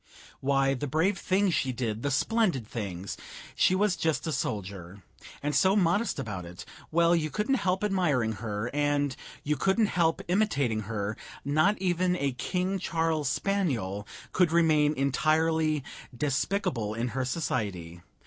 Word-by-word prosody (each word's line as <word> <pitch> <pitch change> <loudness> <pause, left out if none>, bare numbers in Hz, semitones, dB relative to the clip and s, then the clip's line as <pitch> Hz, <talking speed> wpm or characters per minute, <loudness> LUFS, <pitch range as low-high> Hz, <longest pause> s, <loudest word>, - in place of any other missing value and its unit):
Why, 135 0 +2
the 135 +2 -3
brave 165 +8 +1
things 190 0 +2
she 130 - +1
did, 115 -3 -3
the 145 - 0
splendid 170 - +1
things! 100 -5 -5 0.4
she 185 - +3
was 200 -1 +2
just 160 -2 0
a 160 - -1
soldier; 100 - -4 0.4
and 150 +1 0
so 190 +5 +4
modest 200 +3 +2
about 105 -9 -4
it 85 +1 -9 0.2
well, 170 +1 +4
you 155 -2 0
couldn't 210 - 0
help 185 +1 0
admiring 165 - +1
her, 110 +1 -3
and 145 -2 +1 0.3
you 150 +1 0
couldn't 195 - +2
help 165 -2 +2
imitating 150 - +1
her; 105 -1 -2 0.3
not 155 +9 +3
even 180 -1 +1
a 140 -6 0
King 180 +9 -2
Charles 160 -4 0
spaniel 130 - -1 0.2
could 180 -3 +3
remain 155 -3 +3
entirely 155 +2 +1 0.3
despicable 135 - -1
in 120 +2 -1
her 130 +3 -2
society. 100 - -3
150 Hz, 145 wpm, -28 LUFS, 120-180 Hz, 0.4 s, so